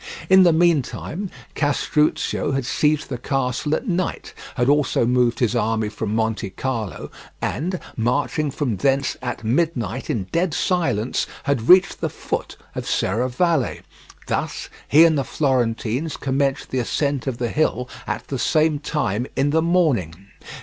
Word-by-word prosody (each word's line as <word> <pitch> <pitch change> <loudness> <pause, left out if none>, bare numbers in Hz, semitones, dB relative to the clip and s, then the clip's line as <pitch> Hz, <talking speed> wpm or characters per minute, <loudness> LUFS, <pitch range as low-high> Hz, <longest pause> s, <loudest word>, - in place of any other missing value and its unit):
In 190 0 +8
the 175 -2 +6
meantime, 170 +3 0 0.2
Castruccio 150 -1 0
had 135 -2 -1
seized 150 +3 +1
the 125 -3 -4
castle 135 +3 -1
at 250 - -5
night, 185 -2 -2 0.2
had 120 - +1
also 145 -4 +3
moved 125 -1 +2
his 120 -1 +1
army 110 -1 0
from 105 0 -3
Montecarlo, 110 0 -3 0.3
and 175 +6 -2 0.2
marching 145 +5 0
from 130 -6 -2
thence 135 +6 +1
at 120 -2 -4
midnight 125 - -1
in 105 - 0
dead 170 -2 0
silence, 135 - 0 0.2
had 130 -5 -1
reached 185 +1 +6
the - - 0
foot - - -4 0.2
of - - -5
Serravalle: 130 - 0 0.4
thus - - -3 0.2
he 155 +4 +7
and 160 -3 +3
the - - 0
Florentines 130 +1 -1
commenced 135 0 -1
the 130 - 0
ascent 140 +2 -1
of 130 -3 -2
the 120 -1 -1
hill 125 -4 0 0.2
at - - -4
the 135 - -3
same 155 +4 +2
time 130 -6 -1
in 140 +1 +1
the 160 +1 +3
morning. 155 - +1
135 Hz, 145 wpm, -22 LUFS, 120-155 Hz, 0.4 s, In